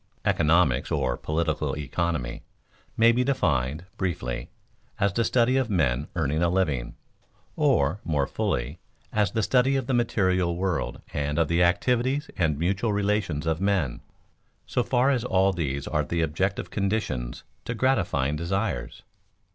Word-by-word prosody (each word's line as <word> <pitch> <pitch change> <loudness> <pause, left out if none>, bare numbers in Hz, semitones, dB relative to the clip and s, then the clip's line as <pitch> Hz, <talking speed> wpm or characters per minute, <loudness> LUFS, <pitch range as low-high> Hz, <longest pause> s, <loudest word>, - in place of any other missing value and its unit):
_Economics, 80 -4 +3
or 65 -5 0
political 80 -2 -1
economy, 75 -3 -2 0.6
may 115 +1 +6
be 125 +2 +2
defined, 75 - 0
briefly, 70 -10 -3 0.5
as 100 -1 +2
the 115 - +1
study 125 +2 +3
of 130 -3 0
men 75 - +1
earning 80 -1 0
a 85 - +3
living; 75 -10 0 0.6
or, 70 +8 +2
more 75 -4 0
fully, 65 +4 -2 0.3
as 105 -1 +1
the 110 -1 +1
study 125 +6 +3
of 135 -2 0
the 130 - -1
material 95 -7 +1
world 90 -1 -2
and 75 0 -1
of 85 -1 +3
the 85 +1 +2
activities 125 +10 +1
and 80 -6 +1
mutual 95 +7 0
relations 100 -7 0
of 80 +1 0
men, 95 -10 0 0.6
so - - 0
far 125 +3 +2
as 125 -4 0
all 95 -4 +2
these 70 -5 -2
are - - 0
the 85 -1 -1
objective 95 +6 -1
conditions 100 - -2 0.2
to 115 - -4
gratifying 100 - +1
desires. 95 +7 -3
90 Hz, 145 wpm, -26 LUFS, 75-110 Hz, 0.6 s, may